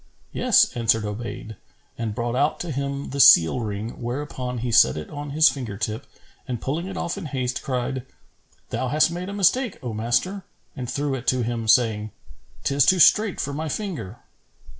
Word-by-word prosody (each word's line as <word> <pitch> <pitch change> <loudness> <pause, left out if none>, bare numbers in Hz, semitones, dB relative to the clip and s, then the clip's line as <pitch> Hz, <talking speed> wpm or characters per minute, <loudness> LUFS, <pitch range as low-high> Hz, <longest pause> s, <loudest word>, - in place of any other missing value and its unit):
"Yes," - - +3
answered 115 -2 +2
Obayd 110 0 -6 0.4
and 110 -3 -4
brought 120 +1 -2
out 145 +4 +1
to 175 - -4
him 140 0 -4
the 140 - -4
seal 85 -4 +7
ring; 110 +1 -5
whereupon 125 0 -4
he 120 - -1
set 65 - +5
it 75 - -7
on 145 0 -6
his 155 +3 +5
finger 120 -9 -3
tip 110 +4 -4 0.4
and 125 -3 -3
pulling 160 +9 -3
it 190 -1 -6
off 175 +3 -3
in 190 - -7
haste, 130 -3 -3
cried, 130 0 -3 0.7
"Thou 125 +3 -2
hast 150 +5 +3
made 180 +2 -5
a - - -5
mistake, 205 +4 +1
O 120 -3 -4
master;" 120 - -1 0.3
and 125 -2 -5
threw 140 +1 -2
it 130 -2 -5
to 130 -1 +2
him, 115 -1 -3
saying, 110 -2 +3 0.5
"'Tis 140 -1 +2
too 185 - +5
strait 210 +4 +5
for 140 - -3
my 155 +2 -3
finger." 160 - -5
130 Hz, 185 wpm, -23 LUFS, 115-150 Hz, 0.7 s, seal